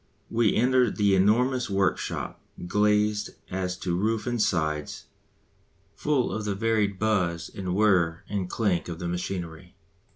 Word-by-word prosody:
We 115 Hz, -3 st, +2 dB
enter 125 Hz, +1 st, +3 dB
the 100 Hz, -1 st, +2 dB
enormous 120 Hz, +7 st, +2 dB
workshop, 95 Hz, -1 st, -1 dB, 0.2 s
glazed 105 Hz, +2 st, +1 dB, 0.2 s
as 90 Hz, -1 st, -2 dB
to 90 Hz, -2 st, -1 dB
roof 110 Hz, +4 st, 0 dB
and 120 Hz, -2 st, -1 dB
sides, 75 Hz, -6 st, -1 dB, 0.9 s
full 145 Hz, -4 st, 0 dB
of 110 Hz, -, -3 dB
the 105 Hz, -1 st, -2 dB
varied 105 Hz, -2 st, +1 dB
buzz 90 Hz, -6 st, 0 dB
and 90 Hz, -2 st, -3 dB
whirr 90 Hz, -6 st, +2 dB
and 95 Hz, -3 st, -3 dB
clank 95 Hz, -5 st, 0 dB
of 85 Hz, -, -5 dB
the 85 Hz, -, -4 dB
machinery. 90 Hz, 0 st, -5 dB
100 Hz, 135 wpm, -26 LUFS, 90-110 Hz, 0.9 s, enter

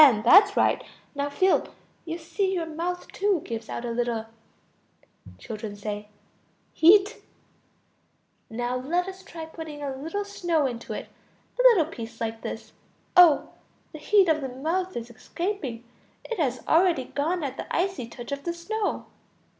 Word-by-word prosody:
That's 360 Hz, -, +7 dB
right. -, -, +3 dB, 0.3 s
Now 285 Hz, 0 st, -2 dB
feel. 370 Hz, +6 st, +1 dB, 0.3 s
You 330 Hz, 0 st, -4 dB
see 380 Hz, +3 st, -1 dB
your 340 Hz, -2 st, -1 dB
mouth 340 Hz, +3 st, -4 dB
too 400 Hz, -3 st, +1 dB
gives 225 Hz, -1 st, -5 dB
out 240 Hz, -, -4 dB
a 235 Hz, -, -2 dB
little... 230 Hz, -1 st, -1 dB, 1.1 s
Children. 210 Hz, -, -7 dB, 1.0 s
Heat. 395 Hz, +5 st, +6 dB, 1.3 s
Now 245 Hz, +2 st, -2 dB
let 345 Hz, +8 st, -1 dB
us 380 Hz, 0 st, -8 dB
try 330 Hz, -4 st, -8 dB
putting 315 Hz, -2 st, -8 dB
a 275 Hz, -2 st, -3 dB
little 325 Hz, +9 st, -4 dB
snow 345 Hz, -6 st, 0 dB
into 240 Hz, -3 st, -4 dB
it. -, -, -6 dB, 0.5 s
A -, -, +5 dB
little 465 Hz, -10 st, +6 dB
piece 230 Hz, -7 st, -8 dB
like 225 Hz, 0 st, -3 dB
this. -, -, -6 dB, 0.4 s
Oh! 345 Hz, -5 st, +7 dB, 0.4 s
the 310 Hz, -, -8 dB
heat 390 Hz, +4 st, +4 dB
of 310 Hz, -2 st, +2 dB
the 265 Hz, -, -3 dB
mouth 330 Hz, +8 st, -2 dB
is 235 Hz, 0 st, -6 dB
escaping, 280 Hz, -, -4 dB, 0.4 s
it 465 Hz, -, -5 dB
has 255 Hz, -5 st, 0 dB
already 330 Hz, -4 st, +4 dB
gone 310 Hz, +7 st, -2 dB
at 270 Hz, -1 st, -4 dB
the -, -, -5 dB
icy 360 Hz, -8 st, -1 dB
touch 240 Hz, +2 st, -9 dB
of 280 Hz, 0 st, -3 dB
the 340 Hz, 0 st, -3 dB
snow. 420 Hz, +5 st, -2 dB
320 Hz, 150 wpm, -26 LUFS, 250-365 Hz, 1.3 s, That's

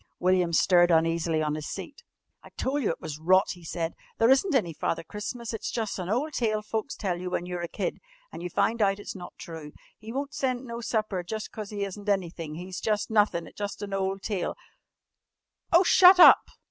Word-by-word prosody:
William 180 Hz, -1 st, +2 dB
stirred 175 Hz, +1 st, +4 dB
uneasily 165 Hz, -1 st, +2 dB
on 150 Hz, -1 st, -1 dB
his 155 Hz, -1 st, -5 dB
seat. 290 Hz, -, -7 dB, 0.4 s
"I -, -, -13 dB
tol' 275 Hz, +3 st, -1 dB
you 250 Hz, -, 0 dB
it 165 Hz, -, -3 dB
was 155 Hz, -2 st, -6 dB
rot," 185 Hz, +5 st, +4 dB
he 175 Hz, -2 st, -10 dB
said. 165 Hz, 0 st, -3 dB, 0.2 s
"There 230 Hz, +3 st, +4 dB
isn't 280 Hz, +5 st, +3 dB
any 175 Hz, -10 st, +1 dB
Father 160 Hz, +2 st, -2 dB
Christmas. 220 Hz, +6 st, -6 dB
It's 225 Hz, -, -4 dB
jus' 220 Hz, -4 st, -3 dB
an' 180 Hz, 0 st, -4 dB
ole 260 Hz, +9 st, 0 dB
tale 215 Hz, -5 st, -1 dB
folks 220 Hz, +5 st, -3 dB
tell 180 Hz, -4 st, -3 dB
you 180 Hz, -, -4 dB
when 175 Hz, -, -2 dB
you're 180 Hz, -1 st, -4 dB
a 170 Hz, -, -3 dB
kid, 485 Hz, -, -3 dB, 0.3 s
an' -, -, -8 dB
you 180 Hz, -, -4 dB
find 225 Hz, +6 st, 0 dB
out 195 Hz, -1 st, +3 dB
it's 205 Hz, -, -8 dB
not 180 Hz, -2 st, -10 dB
true. 160 Hz, -3 st, -9 dB, 0.3 s
He 220 Hz, +1 st, -9 dB
won't 280 Hz, +3 st, -4 dB
send 255 Hz, -2 st, -2 dB
no 235 Hz, -1 st, -6 dB
supper 215 Hz, -5 st, -1 dB
jus' 215 Hz, +5 st, -5 dB
cause 215 Hz, -2 st, -7 dB
he 205 Hz, -1 st, -3 dB
isn't 200 Hz, +1 st, -5 dB
anythin'. 170 Hz, -5 st, -2 dB
He's 180 Hz, +2 st, -6 dB
jus' 215 Hz, 0 st, -1 dB
nothin' 205 Hz, -6 st, +2 dB
jus' 205 Hz, -1 st, -5 dB
an 200 Hz, -1 st, -5 dB
ole 195 Hz, 0 st, -1 dB
tale 195 Hz, -2 st, -3 dB, 0.6 s
" -, -, -52 dB
"Oh, 345 Hz, +2 st, +6 dB
shut 370 Hz, 0 st, +7 dB
_up! 355 Hz, -, +9 dB
200 Hz, 210 wpm, -27 LUFS, 175-225 Hz, 0.6 s, up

